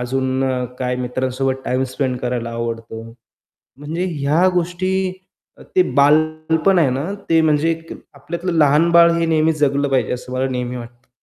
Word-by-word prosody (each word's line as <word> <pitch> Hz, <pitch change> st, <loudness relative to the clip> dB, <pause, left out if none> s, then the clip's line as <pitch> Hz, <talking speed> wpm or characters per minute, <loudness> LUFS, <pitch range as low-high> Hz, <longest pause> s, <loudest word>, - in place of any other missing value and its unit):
अजून 130 Hz, +1 st, -1 dB, 0.4 s
काय 125 Hz, -1 st, -1 dB
मित्रांसोबत 130 Hz, +1 st, -2 dB
टाईम 130 Hz, +1 st, 0 dB
स्पेंड 130 Hz, -3 st, -1 dB
करायला 120 Hz, -2 st, -3 dB
आवडतो. 115 Hz, -1 st, -5 dB, 0.8 s
म्हणजे 160 Hz, +5 st, -3 dB
ह्या 150 Hz, +4 st, +2 dB
गोष्टी, 180 Hz, +1 st, -1 dB, 0.7 s
अ, -, -, -16 dB
ते 370 Hz, -, +5 dB, 0.2 s
बालपण 155 Hz, +5 st, +3 dB
आहे 145 Hz, -, +3 dB
ना, 135 Hz, +4 st, -2 dB, 0.2 s
ते 165 Hz, 0 st, +4 dB
म्हणजे 155 Hz, +1 st, +2 dB
एक 165 Hz, 0 st, -7 dB, 0.2 s
आपल्यातलं 170 Hz, +6 st, -5 dB
लहान 150 Hz, +3 st, +4 dB
बाळ 170 Hz, 0 st, +6 dB
हे 170 Hz, 0 st, +1 dB
नेहमी 160 Hz, 0 st, +2 dB
जगलं 145 Hz, -1 st, +1 dB
पाहिजे, 135 Hz, -1 st, 0 dB
असं 125 Hz, +1 st, -7 dB
मला 130 Hz, +1 st, 0 dB
नेहमी 125 Hz, -1 st, -3 dB
वाटतं. 120 Hz, +1 st, -12 dB
140 Hz, 155 wpm, -19 LUFS, 125-160 Hz, 0.8 s, बाळ